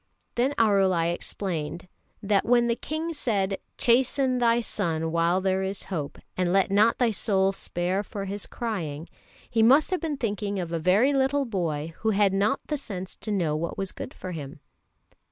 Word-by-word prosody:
Then 260 +4 +1
Arulai 190 -6 +3
explained 175 -2 -4 0.4
that 200 -1 +2
when 240 0 +4
the 235 -1 +1
King 315 +5 -4
said, 200 -9 -1 0.2
"Chasten 255 +1 +3
thy 235 -1 +4
son 165 -8 -2
while 170 +2 +2
there 190 0 +1
is 190 +1 -3
hope, 150 -4 -3 0.2
and 180 -1 0
let 195 +1 +3
not 215 +3 +4
thy 240 -3 +2
soul 195 -2 +1
spare 185 0 -2
for 200 -1 -6
his 200 +1 -4
crying," 170 -10 -4 0.4
he 225 - +1
must 270 +10 +5
have 370 - 0
been 310 -4 -2
thinking 205 -4 -2
of 175 -3 -3
a 165 - -1
very 200 - +3
little 275 +1 +2
boy 165 - -2
who 220 - 0
had 200 -2 +3
not 205 +6 +1
the 300 - -2
sense 190 -9 -6
to 215 - -5
know 170 -7 +1
what 165 +2 -3
was 195 -1 -3
good - - -7
for 185 - -7
him. 145 -4 -7
195 Hz, 180 wpm, -26 LUFS, 175-235 Hz, 0.4 s, must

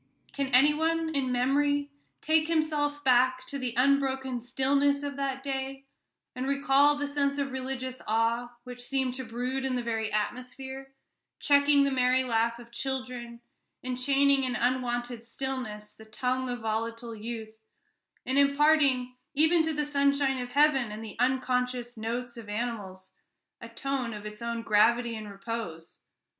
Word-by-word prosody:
Can 275 -1 -1
any 265 +3 +5
one, 325 +1 0
in 270 -3 0
memory, 285 +3 +1 0.3
take 315 0 +2
himself 300 -3 0
back 255 0 +3
to 280 +2 -5
the 250 -2 -3
unbroken 265 -1 +1
stillness 280 +3 +1
of 285 -1 -4
that 270 -1 -2
day, 270 0 -4 0.5
and 255 +1 -3
recall 280 +1 +4
the 290 0 -2
sense 280 -1 0
of 280 -1 -1
religious 260 -1 -4
awe 230 +2 0
which 250 -1 -8
seemed 260 0 -1
to 260 +1 -5
brood 250 +3 -3
in 265 -1 -1
the 245 - -2
very 225 -2 -2
atmosphere, 265 +5 -4 0.5
checking 285 -1 +4
the 280 - +1
merry 255 0 +3
laugh 230 -1 +1
of 235 0 -13
childhood, 250 -2 -5 0.4
and 250 0 -3
chaining 275 +1 +3
in 255 -2 -1
unwonted 245 -1 -1
stillness 235 -4 -5
the 220 - -14
tongue 255 +4 -2
of 245 -1 -4
volatile 230 +1 -3
youth, 220 0 -7 0.7
and 265 +2 +2
imparting 280 -3 +3 0.2
even 320 +3 +5
to 320 0 0
the 300 -1 -1
sunshine 280 -2 +2
of 245 - -5
heaven, 275 -6 +3
and 215 +1 -6
the 220 - -8
unconscious 250 -1 0
notes 235 +2 -4
of 220 -3 -9
animals, 205 -4 -4 0.5
a - - -8
tone 265 -5 -3
of 210 0 -9
its 210 +1 -8
own 235 0 -3
gravity 230 +3 +3
and 215 -1 -7
repose? 200 -5 -6
255 Hz, 155 wpm, -28 LUFS, 235-280 Hz, 0.7 s, any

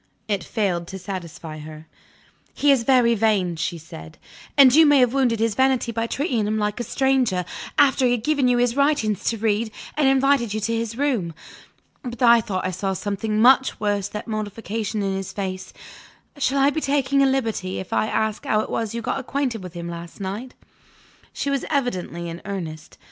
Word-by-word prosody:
It 200 -3 -1
failed 185 -6 -1
to 190 - -7
satisfy 170 -4 -7
her. 155 +1 -10 0.7
"He 290 - +4
is 270 -3 +4
very 245 -3 +4
vain," 205 -6 +1
she 170 +1 -3
said, 80 - -11 0.4
"and 265 -3 +8
you 320 +3 +8
may 290 -2 +5
have 250 -2 +4
wounded 250 -5 +2
his 225 -1 +1
vanity 260 0 +2
by 230 0 -2
treating 245 - -1
him 215 +1 0
like 210 +1 -1
a - - -1
stranger, 250 -7 +1 0.3
after 270 -2 +4
he 245 - +2
had 235 -3 -2
given 285 -2 +2
you 245 -1 +3
his 245 0 +1
writings 280 -8 +1
to 230 - 0
read, 220 +1 0 0.3
and 295 -2 +2
invited 270 -5 +2
you - - -1
to 230 +2 -1
his 230 0 -3
room. 240 - -1 0.7
But 245 -1 -5
I 235 -1 +7
thought 185 -4 -3
I 185 - -1
saw 190 +2 -2
something 205 +3 -2
much 260 +3 +4
worse 205 -2 0
than 210 +1 -6
mortification 215 0 -3
in 195 -1 -1
his 195 -1 -4
face. 190 -2 -5 0.6
Shall 280 -1 0
I 275 +1 +4
be 315 - -2
taking 275 -1 +1
a 275 - +5
liberty, 225 -8 -1
if 190 - -6
I - - +1
ask 220 -1 -1
how 215 - +1
it - - -6
was 225 -1 -2
you 235 - -4
got - - -1
acquainted 260 -4 -2
with 180 -2 -9
him 170 0 -5
last 170 +1 -8
night?" 205 +7 -5 0.8
She 280 - -3
was 275 -2 -1
evidently 185 - -2
in 170 +1 -7
earnest. 165 -6 -6
225 Hz, 195 wpm, -23 LUFS, 195-260 Hz, 0.8 s, and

